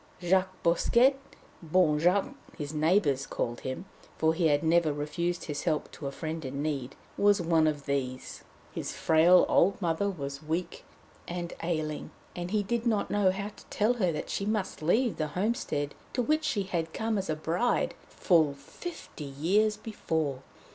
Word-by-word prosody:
Jacques 185 +1 +1
Bosquet 235 +10 +4 0.5
Bon 160 -2 +3
Jacques 185 - +2 0.2
his 150 -2 -5
neighbours 150 -4 +2
called 120 0 -3
him, 130 +8 -5 0.3
for 160 0 +3
he 165 0 +2
had 145 0 +2
never 165 -1 +3
refused 170 +4 -2
his 145 -3 -4
help 155 -3 0
to 140 - -6
a - - -3
friend 160 +2 -5
in 140 +2 -4
need 140 -4 -3 0.2
was 205 0 +5
one 165 -2 +3
of 145 -2 -2
these. 130 -2 -3 0.3
His - - -4
frail 165 +3 +5
old 195 +3 +3
mother 175 +2 0
was 140 -6 -5
weak 160 +3 -3 0.4
and 175 0 -4
ailing, 155 -3 -2 0.3
and 175 0 -4
he 210 +1 +1
did 235 +4 -1
not 215 -3 +1
know 205 -2 +3
how 200 +2 -2
to - - -16
tell 215 +4 +1
her 190 -8 +1
that 150 - -4
she - - -2
must 210 -4 -2
leave 220 +9 +2
the 155 - -1
homestead 185 - -1 0.2
to 250 - +1
which 310 +5 +1
she 205 -9 0
had 165 -4 -3
come 220 0 -1
as 190 - -4
a 155 - +1
bride, 170 +9 0 0.2
full 160 -6 +3
fifty 245 - -9
years 190 +10 +1
before. 160 - -2
170 Hz, 170 wpm, -29 LUFS, 150-200 Hz, 0.5 s, was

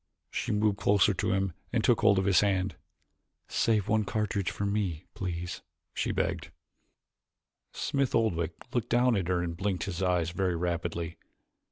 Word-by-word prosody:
She - - -2
moved 105 -1 +1
closer 100 0 +4
to 90 - -1
him 95 -2 0 0.2
and - - +1
took - - +3
hold 100 -2 +5
of 95 - +2
his 95 -3 +5
hand. 95 -2 +1 0.7
"Save 110 -4 +1
one 110 0 +2
cartridge 100 -2 -1
for 100 - -3
me, 100 -5 -1
please?" 90 -2 -4 0.3
she - - -1
begged. 85 +1 -1 1.2
Smith 140 -2 0
Oldwick 85 -7 +1 0.2
looked 120 -3 -1
down 120 0 +4
at 95 -4 -1
her 90 -1 +1
and 85 -1 -3
blinked 95 -1 -1
his 95 -2 -4
eyes 90 -3 +1
very 90 0 0
rapidly. 85 -1 -2
95 Hz, 160 wpm, -29 LUFS, 85-105 Hz, 1.2 s, hold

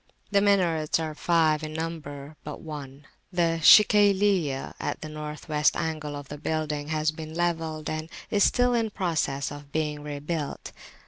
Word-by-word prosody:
The 200 -1 +4
minarets 175 -7 +2
are 160 -1 -3
five 160 -1 +2
in 155 0 -5
number; 155 -3 -6
but 150 - -7
one, 145 -3 -8 0.3
the 170 -2 +1
Shikayliyah, 200 -7 +5
at - - -3
the 155 - -6
North 150 +1 -7
West 150 -1 +2
angle 155 -2 -3
of 145 -1 -8
the 150 +1 -8
building, 150 -1 -2
has 155 0 0
been 155 0 -8
levelled, 165 -3 -1
and 155 +1 -3 0.2
is 205 -3 +3
still 245 0 +3
in 230 -2 +1
process 160 -8 -1
of 145 -1 -10
being 150 -1 -2
rebuilt. 150 +1 -4
155 Hz, 155 wpm, -26 LUFS, 150-170 Hz, 0.3 s, Shikayliyah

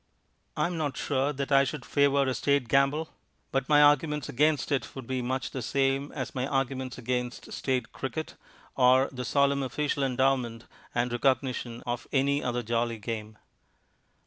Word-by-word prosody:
I - - +2
am 175 -1 -2
not 150 -4 -2
sure 140 +1 0
that 140 0 -4
I 135 0 +6
should 140 -2 -4
favour 140 -1 +3
a 130 -1 0
State 140 -1 +1
gamble, 140 +6 +2 0.4
but 135 +1 -1
my 150 -1 +7
arguments 145 0 +3
against 150 +2 +1
it 135 -5 -1
would 135 -2 -7
be 130 +1 -2
much 130 +1 -2
the 130 - -4
same 135 +3 0
as 130 -3 -4
my 130 0 -2
arguments 130 -2 -2
against 125 0 -3
State 125 -3 -1
cricket 155 +4 -5 0.4
or 130 +1 +5
the 125 -2 -5
solemn 140 +2 +2
official 140 +2 -1
endowment 130 -3 0 0.3
and 120 0 +1
recognition 125 -1 0
of 120 0 -3
any 140 +1 +2
other 120 -1 -1
jolly 115 +1 -1
game. 110 0 -6
135 Hz, 165 wpm, -28 LUFS, 125-140 Hz, 0.4 s, my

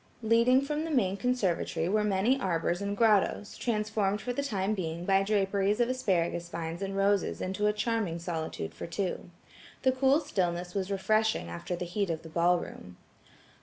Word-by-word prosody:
Leading 235 +4 +4
from 300 +2 -2
the 325 - -4
main 200 -11 +1
conservatory 195 -8 0
were 210 +3 +2
many 210 +6 +2
arbors 170 -1 0
and 200 0 -2
grottoes, 210 -2 +2
transformed 210 -3 0
for 245 +3 -3
the 280 - -1
time 210 -7 -1
being 170 -3 -4
by 195 0 +4
draperies 200 +1 +1
of 240 0 +2
asparagus 175 -8 0
vines 165 +1 -5
and 195 0 -3
roses 200 0 +1
into 195 +3 -1
a - - +4
charming 210 -5 -1
solitude 165 - -4
for - - -7
two. 180 +1 -3 0.5
The 260 - +5
cool 265 +3 +3
stillness 175 - -2
was 195 -1 -2
refreshing 210 - +1
after 85 - -4
the 180 - -4
head 195 +2 -2
of 160 -1 -3
the 160 - -9
ball 170 +2 +3
room. 90 - -9
195 Hz, 175 wpm, -29 LUFS, 175-220 Hz, 0.5 s, The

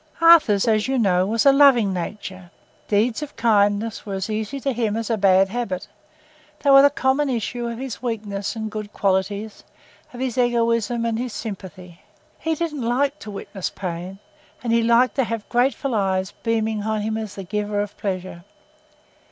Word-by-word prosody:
Arthur's, 315 - +6
as 215 0 +2
you 265 0 0
know, 185 -5 +2
was 225 +4 0
a 275 - +8
loving 270 -8 +5
nature. 185 0 -6 0.4
Deeds 220 +5 +1
of 300 -1 -7
kindness 210 -1 +1
were 200 -2 -5
as 190 +3 -3
easy 220 +6 -3
to 275 0 -1
him 225 -2 -1
as 230 0 -3
a - - +3
bad 195 -1 +4
habit: 205 -4 -3 0.8
they 280 - +4
were 275 0 +9
the 285 - +6
common 275 0 +1
issue 240 0 -2
of 235 -1 -5
his 260 -1 -6
weaknesses 210 -4 -3
and 220 -1 -4
good 210 -1 -6
qualities, 200 +2 -1 0.5
of 245 - -10
his 260 -1 -2
egoism 235 -1 +1
and 230 -1 -1
his 245 -2 -4
sympathy. 185 -4 -8 0.4
He 320 0 -1
didn't 305 -3 -3
like 275 +5 0
to 215 - -9
witness 195 -2 -5
pain, 180 0 -6 0.5
and 235 -1 0
he 230 - +4
liked 235 +2 +3
to 265 - +3
have 230 -2 -4
grateful 255 +2 +1
eyes 190 -3 0
beaming 220 -2 0
on 215 0 -1
him 220 +1 -2
as 220 -2 -5
the 195 - -6
giver 210 +2 -2
of 205 0 -3
pleasure. 185 -3 -5
220 Hz, 180 wpm, -22 LUFS, 200-245 Hz, 0.8 s, were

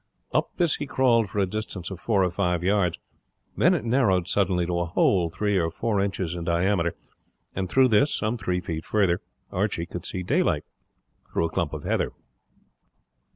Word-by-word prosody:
Up - - +1
this 170 -4 +2
he 145 - -4
crawled 120 -6 +3
for - - -7
a 100 - +3
distance 100 -2 -5
of 95 - -6
four 100 -3 +2
or 90 - +1
five 90 -2 0
yards, 95 -3 +2 0.6
then - - +4
it - - -3
narrowed 110 -8 +2
suddenly 90 -2 +1
to 85 0 -1
a 85 - 0
hole 85 0 +2
three 105 +3 0
or 80 -1 +1
four 100 +4 -1
inches 95 -4 -2
in 85 -1 -5
diameter, 85 0 +1 0.6
and 95 -1 -2
through 130 +3 +4
this, 120 +7 +4
some 110 +2 0
three 90 -5 -2
feet 80 -2 -4
farther, 95 -4 +1 0.3
Archie 95 -3 -1
could 90 0 -7
see 90 - -4
the - - -2
daylight - - +2 0.7
through 85 - +1
a 80 - -3
clump 85 -4 -1
of 75 -2 -6
heather. - - 0
95 Hz, 190 wpm, -25 LUFS, 85-105 Hz, 0.7 s, then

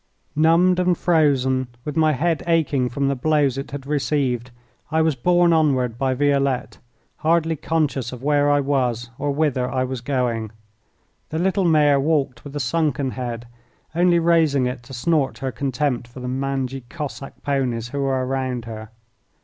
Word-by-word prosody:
Numbed 170 +4 +4
and 180 -1 +2
frozen, 135 -6 +2 0.2
with 150 - -4
my 155 -1 +3
head 160 +4 0
aching 145 -6 +1
from 140 +3 -1
the 140 - +1
blows 145 -1 +2
it 135 - -6
had 140 -1 -7
received, 135 -4 -1 0.4
I 160 +1 +2
was 160 -1 +2
borne 175 +6 +3
onward 130 -7 +1
by 130 -1 +1
Violette, 140 -2 0 0.4
hardly 165 0 +1
conscious 145 -6 -1
of 125 0 -9
where 145 0 +3
I 145 0 +3
was 125 -4 -1
or 145 - -1
whither 140 -4 0
I 130 -1 0
was 130 -1 -4
going. 120 -5 -1 0.8
The 160 - -3
little 190 +2 +1
mare 150 -4 +4
walked 135 -5 0
with 145 0 -9
a - - -2
sunken 145 0 0
head, 120 -2 -5 0.5
only 175 +1 +3
raising 165 -5 +3
it 125 0 -3
to 135 - -11
snort 150 +1 0
her 130 0 -3
contempt 130 0 -2
for 120 +2 -12
the 125 - -5
mangy 135 0 -2
Cossack 145 -3 -7
ponies 125 -5 -1
who 140 - -4
were 135 -1 0
round 130 -2 -2
her. 110 -1 -8
140 Hz, 165 wpm, -22 LUFS, 125-155 Hz, 0.8 s, Numbed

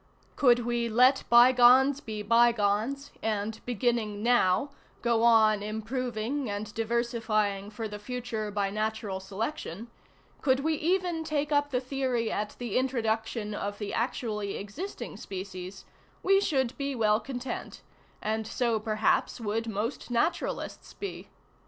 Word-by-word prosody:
"Could 245 -3 +4
we 240 -1 0
"let 255 +4 +4
by 240 +2 +8
gones 260 +3 +6
be 215 -6 -5
by 235 +3 +5
gones," 225 +6 -1
and, 220 0 -2
beginning 230 -3 0
now, 240 +2 +3 0.3
go 235 -1 +2
on 220 -3 +5
improving 230 +4 -3
and 205 +1 -4
diversifying 225 -3 0
for 220 +1 -5
the 210 0 -7
future 230 -1 -4
by 200 -1 -1
natural 215 -2 -2
selection, 210 - -5 0.5
ŌĆö - - -27
could 260 -2 +3
we 320 +2 +1
even 345 +1 0
take 300 -1 -1
up 290 0 +2
the 250 -3 0
theory 255 -3 -1
at 210 0 -3
the 240 -2 -1
introduction 225 -4 -1
of 205 0 -4
the 205 -2 -5
actually 220 -4 -2
existing 275 - -6
species, 190 0 -7 0.4
we 390 +1 +4
should 265 -9 0
be 280 -1 -2
well 215 -2 +3
content, 250 +2 -6 0.4
and 220 +1 -1
so 235 -2 0
perhaps 215 +3 +1
would 225 +1 -2
most 220 +6 -3
naturalists 245 +8 -2
be. 400 - -7
230 Hz, 140 wpm, -29 LUFS, 210-255 Hz, 0.5 s, by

